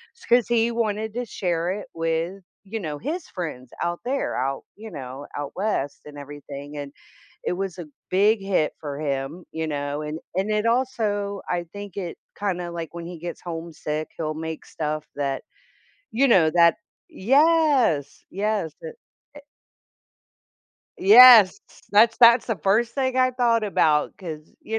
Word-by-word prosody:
it's - - -17
'cause 240 -1 +3
he 235 0 +2
wanted 220 -1 -2
to 245 - -2
share 175 -5 -2
it 205 +2 -5
with, 165 +3 -2 0.2
you 220 +3 -5
know, 155 -5 -4
his 315 - -4
friends 140 -9 -6
out 175 0 -2
there 270 +2 -1
out, 135 +2 -2
you 220 +1 -9
know, 135 +1 -8
out 145 -1 -4
west 190 -9 -2
and 145 -1 -11
everything 145 0 -9
and 140 0 -7 0.5
it - - 0
was 190 0 -4
a 175 - -6 0.2
big 205 +3 +3
hit 190 -6 0
for 145 -2 -6
him, 140 +3 -3
you 160 0 -3
know, 145 0 -3
and 150 +1 -5 0.2
and 195 +3 0
it 210 +1 0
also, 220 -5 0
I 175 -1 -1
think 205 -2 -8
it 180 -4 -5 0.2
kinda 180 -4 -2
like 170 -1 -6
when 170 -1 -7
he 175 0 -8
gets 175 +1 -7
homesick, 165 -2 -5
he'll 155 -1 -2
make 160 0 -6
stuff 155 -1 -4
that, 140 -2 -2 0.7
you 270 +5 +3
know, 175 -9 +5
that 170 -1 +5 0.3
yes, 275 - +2
yes, 205 -4 -1
to 485 - -6 0.4
eh 290 - -9 1.6
Yes, 220 -1 +9 0.3
that's 225 +3 +5
that's 235 0 +7
the 225 -4 -1
first 225 +4 +2
thing 260 -2 0
I 255 0 +3
thought 235 -3 +2
about 155 -7 +2
'cause, 160 -5 -9
you 220 0 -2
185 Hz, 160 wpm, -24 LUFS, 155-225 Hz, 1.6 s, Yes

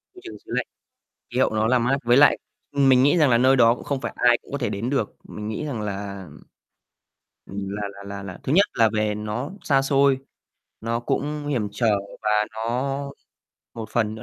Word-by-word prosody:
Môi 370 - -13
trường 355 - -8
xứ - - -15
lạnh, - - 0 0.7
khí 125 - +1
hậu - - +3
nó 110 0 +1
là 125 +2 +3
mát 125 +3 +1
với 120 +1 +4
lại 145 +2 +6 0.3
ừm, 140 -1 +3
mình 130 -1 +6
nghĩ 145 +5 +4
rằng 150 -5 +4
là 120 - +4
nơi 130 +2 +5
đó 115 -2 +5
cũng - - -11
không 140 -2 -2
phải - - -4
ai 120 -1 +4
cũng - - -16
có 140 - -1
thể 120 -4 -1
đến 110 +5 -3
được, 135 -7 -1
mình 105 0 -7
nghĩ 110 +8 -4
rằng 130 -7 -4
là, 100 -2 -5 1.2
ưm, 100 0 -5
là 105 +1 -4
là 100 0 -11
là 100 0 -7
là 90 -2 -8
thứ 135 - -2
nhất 200 +4 +5
là 115 -1 +4
về 105 -1 0
nó 105 +7 -4
xa 135 -2 +2
xôi, 135 0 +3 0.6
nó 115 +1 -2
cũng 145 +4 -2
hiểm 125 -8 -1
trở, 110 -1 +2 0.3
và 105 - 0 0.2
nó 130 +5 -2 0.6
một 110 -2 -6
phần 110 -2 0
nữa 110 - -9
120 Hz, 220 wpm, -23 LUFS, 105-135 Hz, 1.2 s, lại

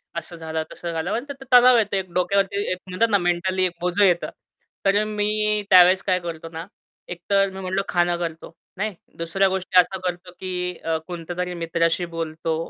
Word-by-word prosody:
असं 170 +1 -6
झालं, 160 -1 -4
तसं 170 - -6
झालं. 160 -1 -3
म्हणतात 275 +5 -3
ना, 270 - -10
तर 250 -1 +7
तणाव 250 0 +6
येतो, 210 -3 +1
एक 185 -2 -3
डोक्यावरती, 200 +2 +1
एक 185 - -1
म्हणतात 220 +5 +1
ना, 205 - +4
मेंटली 185 +1 0
एक 180 - 0
बोझं 180 +3 +2
येतं. 175 -3 +3 0.6
तर 195 0 +4
अ, - - +1
मी 210 0 0
त्यावेळेस 185 0 +7
काय 185 -2 +1
करतो 165 -2 -7
ना, 165 +1 -7 0.4
एकतर 195 +3 0
मी 190 - -8
म्हणलो, 190 +1 -1
खाणं 175 -1 +1
करतो, 165 -2 -6 0.2
नाही. 210 0 -2 0.2
दुसऱ्या 170 +4 +1
गोष्टी 185 -1 +2
असं 190 +1 +2
करतो, 180 0 -5
की 180 -1 -3
अ, 165 0 0
कोणत्यातरी 180 +1 -4
मित्राशी 165 +1 0
बोलतो, 160 0 -3
180 Hz, 190 wpm, -23 LUFS, 170-195 Hz, 0.6 s, तर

